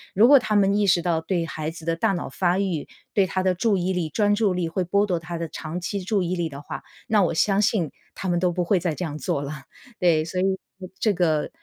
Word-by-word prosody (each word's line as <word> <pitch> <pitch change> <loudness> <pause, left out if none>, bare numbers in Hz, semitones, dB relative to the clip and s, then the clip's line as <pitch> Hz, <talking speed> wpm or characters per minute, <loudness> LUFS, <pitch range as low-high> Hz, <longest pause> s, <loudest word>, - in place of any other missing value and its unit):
如 220 +5 +7
果 280 -1 +8
他 215 -3 -1
们 200 -1 +4
意 205 -1 +2
识 175 -2 +3
到 165 -2 +1
对 170 0 -1
孩 155 -1 -4
子 165 0 -10
的 165 0 +1
大 195 +4 +1
脑 175 - -4
发 180 0 +1
育， 185 -7 -1 0.3
对 195 -2 +3
他 185 0 -1
的 185 -1 +3
注 200 +2 +1
意 185 +1 0
力， 170 -3 -1
专 205 +5 +2
注 205 -3 +2
力 175 -2 -1
会 180 +3 -1
剥 200 +4 +2
夺 180 -4 -1
他 165 +1 -6
的 165 0 -3
长 160 +3 -5
期 185 +3 -3
注 195 0 0
意 180 +1 -1
力 170 -2 -1
的 140 0 -9
话， - - -6 0.3
那 215 -3 +3
我 170 - +2
相 200 +3 +3
信 190 -8 +1 0.2
他 190 - -5
们 175 -1 +1
都 180 -1 +2
不 180 +1 -1
会 190 0 +3
再 165 -3 -1
这 180 - -3
样 150 -1 -5
做 140 - -1
了。 140 +2 -5 0.5
对， 160 -3 +3
所 180 +2 -2
以 - - +1 0.6
这 215 -2 +2
个， 160 -4 +1
180 Hz, 285 characters per minute, -24 LUFS, 165-195 Hz, 0.6 s, 果